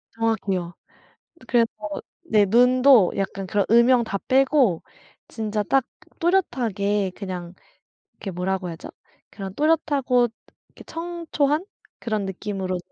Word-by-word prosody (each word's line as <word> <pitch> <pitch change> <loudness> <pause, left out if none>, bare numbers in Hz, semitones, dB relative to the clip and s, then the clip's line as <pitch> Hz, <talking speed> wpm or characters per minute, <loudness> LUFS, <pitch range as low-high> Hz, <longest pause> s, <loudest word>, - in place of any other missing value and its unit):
정확해요. 195 -6 -1 0.8
그래서 230 -1 +3 0.6
네 210 -2 +5
눈도 250 0 +5
약간 195 0 -3
그런 200 0 +1
음영 235 +1 +5
다 200 -2 -3
빼고 260 - +3 0.5
진짜 215 -2 -2
딱 270 +2 +2 0.4
또렷하게 215 - 0
그냥 180 -3 -6 0.6
이렇게 195 - -7
뭐라고 185 +1 -2
해야 170 - -5
하죠? 165 - -10 0.4
그런 195 -2 -7
또렷하고 285 -5 +2 0.4
이렇게 - - -16
청초한 330 -2 -2 0.3
그런 215 -3 -2
느낌으로 190 -1 -4
220 Hz, 260 characters per minute, -23 LUFS, 195-265 Hz, 0.8 s, 네